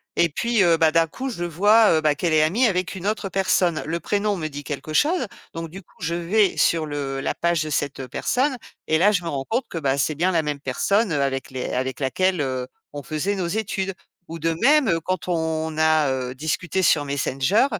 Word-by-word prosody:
Et 170 - +3
puis, 230 +5 +1
heu, 170 -2 +4
bah, 160 -1 +4
d'un 165 0 +4
coup, 265 +10 -5
je 175 -8 -5
vois, 205 +6 +4
heu, - - 0
bah, 150 -1 +2
qu'elle 170 +2 -1
est 155 - +4
amie 195 +12 +2
avec 185 -2 -1
une 190 +1 -7
autre 210 -1 -1
personne. 180 -3 +1
Le 165 +2 -2
prénom 205 +1 -1
me 155 -2 -3
dit 145 -1 -8
quelque 150 +2 -6
chose. 305 - +2 0.3
Donc 165 -1 -5
du 190 +4 -9
coup, - - -29
je 170 -1 -2
vais 190 +4 +2
sur 165 -2 +2
le 140 -2 -4
la 135 - -2
page 170 -2 +1
de 155 - -5
cette, 145 -2 -2
heu, 130 - -5
personne 260 - 0 0.3
et 160 - +3
là, 200 +6 +4
je 180 -4 0
me - - -5
rends 135 -3 -3
compte 240 +3 0
que, 165 - -6
bah, 140 -3 0
c'est 150 +2 0
bien 175 +5 +1
la 165 -3 +2
même 145 -2 -4
personne, 200 - +1
heu, 145 - +1
avec 135 -1 -2
les 130 -1 -4
avec 130 -1 -2
laquelle, 180 +6 0
heu, 130 -2 -2 0.3
on 145 - -6
faisait 155 +9 -2
nos 185 -3 -2
études. 195 -1 -2 0.4
Ou 165 - -6
de 165 +1 0
même, 290 +1 +5
heu, 165 - +2
quand 185 -1 -3
on 160 -2 -1
a, 155 -3 +3
heu, 130 -1 -3
discuté 165 +6 -2
sur 155 -3 +4
Messenger, 140 - +1
165 Hz, 235 wpm, -23 LUFS, 145-190 Hz, 0.4 s, même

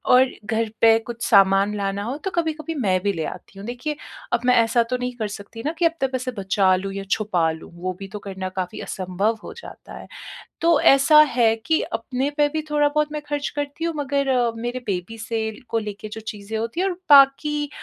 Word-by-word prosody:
और 255 +1 +7 0.2
घर 225 +1 -1
पे 225 -1 +7
कुछ 235 0 -9
सामान 195 -1 +4
लाना 200 0 -2
हो 250 +7 -3
तो 385 - -1
कभी-कभी 320 -1 -2
मैं 195 -9 +1
भी 200 -1 +1
ले 160 -3 -3
आती 195 - -9
हूँ। 200 - -8
देखिए, 250 +5 -4 0.4
अब 240 - +3
मैं 250 0 +5
ऐसा 230 +1 +2
तो 250 - 0
नहीं 250 0 -3
कर 215 - -2
सकती 205 +2 -9
ना 305 - +1
कि 340 - +2
अपने 330 -5 +1
पैसे 255 -1 -3
बचा 195 -2 +2
लूँ 195 +1 -4
या 195 - -4
छुपा 180 -7 +1
लूँ, 160 0 -10
वो 185 +2 -3
भी 195 - -7
तो 205 +2 -7
करना 190 -2 -5
काफ़ी 185 -1 -5
असंभव 195 +4 -2
हो - - -8
जाता - - -11
है। - - -11 0.5
तो 335 -2 +4
ऐसा 275 +3 +6 0.2
है 225 -2 +4
कि 320 0 +2
अपने 250 +5 -2
पे 295 - +4
भी 315 - 0
थोड़ा 295 -1 +3
बहुत 300 0 0
मैं 300 - -4
खर्च 290 -1 -2
करती 290 +2 -4
हूँ 335 - -1
मगर 280 -1 -1
अ, 245 -3 +2
मेरे 240 +2 -4
बेबी 195 +4 -3
से 220 0 -3 0.2
को 230 - +1
लेकर 210 0 -6
जो 220 - -7
चीज़ें 215 0 -6
होती 230 +9 -3
हैं 390 - +2
और 370 - -1 0.2
बाकी 290 +1 +5
230 Hz, 220 wpm, -22 LUFS, 200-285 Hz, 0.5 s, और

